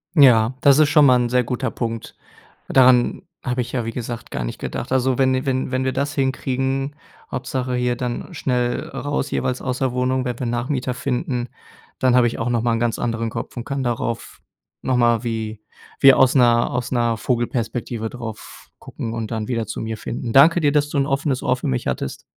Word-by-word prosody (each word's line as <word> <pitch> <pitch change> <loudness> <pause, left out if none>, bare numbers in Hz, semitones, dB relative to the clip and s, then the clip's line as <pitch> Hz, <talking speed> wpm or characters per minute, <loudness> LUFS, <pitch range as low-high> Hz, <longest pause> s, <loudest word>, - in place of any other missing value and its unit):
Ja, 125 -5 +6
das 140 -1 +6
ist 155 -1 +5
schon 150 -1 +6
mal 130 -2 +6
'n 120 -1 0
sehr 125 0 +2
guter 125 +2 -2
Punkt. 115 -2 -5 0.5
Daran 125 -2 +4 0.2
habe 125 -1 0
ich 125 +1 -5
ja, 120 -3 -2
wie 115 - -3
gesagt, 120 -1 -6
gar 65 - -3
nicht - - -5
gedacht. 125 - -5
Also, 130 -1 +2
wenn 130 -1 +2
wenn 130 -1 -1
wenn 130 0 0
wir 130 - 0
das 140 +2 -1
hinkriegen 135 0 -1 0.4
Hauptsache 130 -1 -2
hier 125 0 0
dann 125 +7 -4
schnell, 125 -5 -1
äh, - - -7
raus 145 0 -2
jeweils 130 -1 -1
aus 130 -1 -2
der 130 -2 0
Wohnung, 130 +1 0
wenn 125 -2 -3
wir 125 - -4
Nachmieter 125 +2 -2
finden, 125 0 -2 0.5
dann 130 -1 +3
habe 125 -1 +5
ich 115 - -4
auch 115 +1 -1
noch 120 -2 +1
mal 120 0 +1
'n 115 - 0
ganz 120 -2 0
anderen 115 -1 -1
Kopf - - -6
und 120 - -4
kann 140 +1 -3
darauf 115 -1 -3 0.4
noch 130 -1 0
mal 120 -1 +3
wie 110 -2 -4 0.4
wie 135 -1 +9
aus 130 0 +4
'ner 120 -2 +4
aus 125 -1 -3
'ner 120 -2 +1
Vogelperspektive 120 -1 -2
drauf 115 -3 -9
gucken 115 - -6
und 115 -1 -4
dann 110 -2 -3
wieder 115 -3 -1
zu 110 - -6
mir 110 0 -3
finden. 115 +1 -5
Danke 160 +6 +7
dir, 145 -3 +2
dass 145 -1 +2
du 150 - -3
'n 135 - +2
offenes 135 -1 -1
Ohr 125 - +1
für 130 - -5
mich 65 - -1
hattest. 65 - -3
125 Hz, 210 wpm, -21 LUFS, 120-130 Hz, 0.5 s, wie